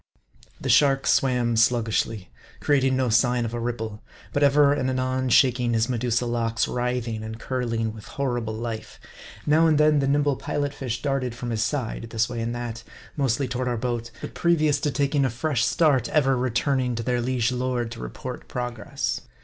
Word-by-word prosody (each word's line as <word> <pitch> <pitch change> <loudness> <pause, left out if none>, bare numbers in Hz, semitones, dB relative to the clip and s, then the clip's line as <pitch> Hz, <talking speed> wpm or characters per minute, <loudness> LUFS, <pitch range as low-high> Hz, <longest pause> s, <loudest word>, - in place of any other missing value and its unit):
The - - -5
shark 135 -2 +4
swam 125 -3 +2
sluggishly; 115 -3 +1 0.3
creating 135 -2 +2
no 130 -2 +1
sign 120 +2 +2
of 115 - -5
a 120 - -2
ripple; 110 -3 -4 0.3
but 145 - 0
ever 145 0 +5
and 130 -2 -1
anon 130 0 -1
shaking 125 -2 +3
his 115 +2 +1
Medusa 120 0 0
locks, 115 -1 0
writhing 125 -2 -2
and 110 +1 -7
curling 115 -3 -2
with 110 -1 -11
horrible 120 -5 -2
life. 115 -1 -6 0.5
Now 155 +2 +4
and 155 -2 +3
then, 150 0 +4
the 135 - +1
nimble 145 -1 +2
Pilot 145 -1 -2
fish 125 -5 -4
darted 135 -4 -1
from 120 -1 -5
his 110 -1 -1
side 115 -1 -2
this 115 0 0
way 120 -2 -4
and 115 +1 -2
that 120 -1 -5 0.3
mostly 135 -2 0
to 120 0 -3
ward 130 - -1
our 120 -1 -1
boat; 120 0 -3
but - - -7
previous 155 -4 +2
to 145 - 0
taking 140 0 +1
a 135 - +2
fresh 120 +1 -1
start 135 -2 +2
ever 135 -3 +3
re 130 +1 0
turning 125 0 0
to 115 - -3
their 125 +1 0
liege 125 -1 0
lord 125 -2 -2
to 115 - -8
report 125 +2 -7
progress. 120 -4 -3
125 Hz, 190 wpm, -25 LUFS, 115-135 Hz, 0.5 s, ever